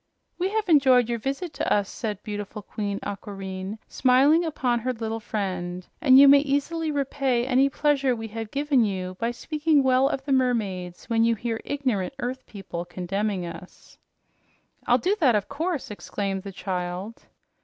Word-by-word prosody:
"We 370 Hz, +2 st, +1 dB
have 430 Hz, 0 st, -1 dB
enjoyed 260 Hz, -7 st, +5 dB
your 235 Hz, -1 st, -1 dB
visit 275 Hz, +7 st, -3 dB
to 280 Hz, -, -2 dB
us," 205 Hz, -2 st, +2 dB
said 210 Hz, -3 st, -5 dB
beautiful 205 Hz, 0 st, -6 dB
Queen 200 Hz, -1 st, -4 dB
Aquareine, 195 Hz, 0 st, -6 dB
smiling 275 Hz, +6 st, +4 dB
upon 255 Hz, -7 st, 0 dB
her 255 Hz, +2 st, -2 dB
little 225 Hz, -1 st, -4 dB
friend, 185 Hz, -5 st, -4 dB, 0.2 s
"and 260 Hz, -2 st, +7 dB
you 280 Hz, +1 st, +9 dB
may 280 Hz, +1 st, +8 dB
easily 295 Hz, +3 st, -1 dB
repay 275 Hz, -4 st, 0 dB
any 265 Hz, +1 st, +3 dB
pleasure 275 Hz, -3 st, +1 dB
we 225 Hz, -1 st, -6 dB
have 225 Hz, 0 st, -6 dB
given 280 Hz, -2 st, +2 dB
you 185 Hz, -3 st, -3 dB
by 230 Hz, -, 0 dB
speaking 300 Hz, +4 st, +1 dB
well 260 Hz, +1 st, +4 dB
of 270 Hz, -, -3 dB
the 285 Hz, -, -3 dB
mermaids 210 Hz, -9 st, 0 dB
when 225 Hz, -1 st, +2 dB
you 230 Hz, 0 st, +3 dB
hear 225 Hz, +1 st, -3 dB
ignorant 260 Hz, -6 st, -2 dB
earth 255 Hz, +1 st, -5 dB
people 190 Hz, -4 st, -6 dB
condemning 185 Hz, +2 st, -3 dB
us." 170 Hz, +2 st, -11 dB, 0.9 s
"I'll -, -, +5 dB
do 380 Hz, +3 st, +1 dB
that, 255 Hz, -, +4 dB
of 205 Hz, -1 st, 0 dB
course," 315 Hz, -2 st, -3 dB
exclaimed 200 Hz, -1 st, -3 dB
the 195 Hz, -, -8 dB
child. 185 Hz, +3 st, -5 dB
235 Hz, 165 wpm, -25 LUFS, 200-275 Hz, 0.9 s, you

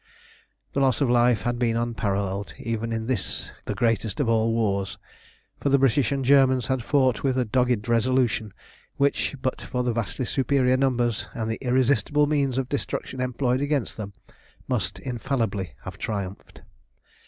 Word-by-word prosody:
The -, -, 0 dB
loss 130 Hz, -4 st, +3 dB
of 135 Hz, -4 st, +2 dB
life 120 Hz, -2 st, +3 dB
had 120 Hz, 0 st, -1 dB
been 115 Hz, -2 st, +1 dB
unparalleled 100 Hz, -4 st, -2 dB
even 115 Hz, 0 st, -3 dB
in 110 Hz, 0 st, -2 dB
this 120 Hz, -5 st, -2 dB
the -, -, -3 dB
greatest 115 Hz, +1 st, 0 dB
of 140 Hz, -, +1 dB
all 115 Hz, 0 st, +2 dB
wars, 100 Hz, -4 st, 0 dB, 0.6 s
for 140 Hz, -, 0 dB
the 140 Hz, -, +5 dB
British 135 Hz, -2 st, +2 dB
and 135 Hz, -2 st, -1 dB
Germans 130 Hz, -2 st, +5 dB
had 130 Hz, -1 st, -1 dB
fought 130 Hz, -3 st, +2 dB
with 130 Hz, -2 st, +1 dB
a 125 Hz, -, +2 dB
dogged 125 Hz, -1 st, +1 dB
resolution 120 Hz, -2 st, +1 dB, 0.5 s
which, 140 Hz, +1 st, +1 dB
but 130 Hz, -, -1 dB
for 125 Hz, 0 st, -2 dB
the 120 Hz, -1 st, 0 dB
vastly 115 Hz, +3 st, -2 dB
superior 130 Hz, 0 st, +2 dB
numbers 125 Hz, -4 st, +1 dB
and 110 Hz, -1 st, -2 dB
the 110 Hz, -, -4 dB
irresistible 130 Hz, +3 st, +2 dB
means 140 Hz, -4 st, 0 dB
of 135 Hz, -1 st, 0 dB
destruction 130 Hz, -1 st, -3 dB
employed 130 Hz, 0 st, 0 dB
against 145 Hz, -3 st, -1 dB
them, 100 Hz, -2 st, -6 dB, 0.5 s
must 105 Hz, -7 st, -1 dB
infallibly 115 Hz, -, -2 dB
have -, -, -8 dB
triumphed. 100 Hz, -3 st, -5 dB
125 Hz, 160 wpm, -25 LUFS, 110-130 Hz, 0.6 s, the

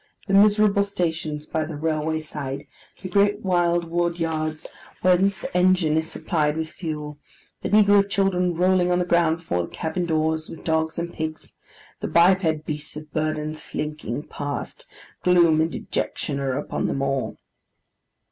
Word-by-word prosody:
The 195 Hz, -, -2 dB
miserable 205 Hz, 0 st, +5 dB
stations 160 Hz, -6 st, -2 dB
by 160 Hz, 0 st, -1 dB
the 155 Hz, 0 st, -6 dB
railway 155 Hz, +1 st, -1 dB
side, 145 Hz, -3 st, -6 dB, 0.4 s
the -, -, -3 dB
great 205 Hz, +2 st, +2 dB
wild 175 Hz, -2 st, +2 dB
wood 170 Hz, 0 st, 0 dB
yards, 155 Hz, -1 st, -2 dB, 0.4 s
whence 185 Hz, +2 st, +4 dB
the 170 Hz, -, -7 dB
engine 180 Hz, -3 st, +3 dB
is 160 Hz, 0 st, 0 dB
supplied 150 Hz, -2 st, 0 dB
with 160 Hz, -1 st, -3 dB
fuel; 150 Hz, -3 st, -6 dB, 0.4 s
the -, -, -3 dB
negro 205 Hz, -1 st, +5 dB
children 180 Hz, -3 st, +1 dB
rolling 180 Hz, +1 st, +3 dB
on 175 Hz, -, +3 dB
the 180 Hz, -, +1 dB
ground 170 Hz, -2 st, +3 dB
before 125 Hz, -, -2 dB
the 85 Hz, -, -4 dB
cabin 175 Hz, +2 st, -3 dB
doors, 160 Hz, 0 st, 0 dB
with 165 Hz, -, -10 dB
dogs 160 Hz, -1 st, 0 dB
and 170 Hz, 0 st, -3 dB
pigs; 160 Hz, 0 st, -5 dB, 0.5 s
the -, -, -3 dB
biped 170 Hz, -3 st, +3 dB
beasts 150 Hz, -1 st, -5 dB
of 155 Hz, -1 st, -10 dB
burden 155 Hz, 0 st, -1 dB
slinking 150 Hz, -3 st, -4 dB
past: 145 Hz, -2 st, -6 dB, 0.3 s
gloom 170 Hz, -3 st, +4 dB
and 160 Hz, +1 st, 0 dB
dejection 140 Hz, -1 st, -3 dB
are 135 Hz, -1 st, -1 dB
upon 145 Hz, -, -2 dB
them 135 Hz, -, -1 dB
all. 135 Hz, -1 st, -1 dB
160 Hz, 155 wpm, -24 LUFS, 155-180 Hz, 0.5 s, miserable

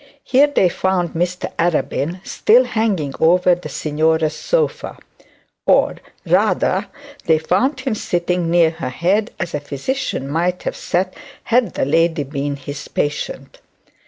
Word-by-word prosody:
Here 275 Hz, +3 st, +4 dB
they 285 Hz, -10 st, +3 dB
found 180 Hz, -1 st, 0 dB
Mr 175 Hz, +2 st, -2 dB
Arabin, 170 Hz, +1 st, -1 dB
still 240 Hz, +4 st, +4 dB
hanging 210 Hz, -, -1 dB
over 180 Hz, +2 st, +4 dB
the 175 Hz, +1 st, -5 dB
signora's 155 Hz, +1 st, 0 dB
sofa; -, -, -1 dB, 0.7 s
or, -, -, +3 dB, 0.3 s
rather, -, -, +2 dB, 0.4 s
they 160 Hz, -2 st, +4 dB
found 250 Hz, -, 0 dB
him 260 Hz, -3 st, -1 dB
sitting 175 Hz, -3 st, -1 dB
near 170 Hz, -1 st, +4 dB
her 160 Hz, -6 st, -5 dB
head, 190 Hz, -, 0 dB
as 170 Hz, -1 st, -3 dB
a 150 Hz, -, -1 dB
physician 145 Hz, -, -3 dB
might 175 Hz, +5 st, -1 dB
have -, -, -3 dB
sat, 185 Hz, +1 st, -1 dB, 0.3 s
had 240 Hz, 0 st, +1 dB
the -, -, 0 dB
lady 165 Hz, +1 st, +2 dB
been 140 Hz, +1 st, -3 dB
his 140 Hz, +1 st, -8 dB
patient. 145 Hz, 0 st, -3 dB
175 Hz, 135 wpm, -19 LUFS, 155-190 Hz, 0.7 s, Here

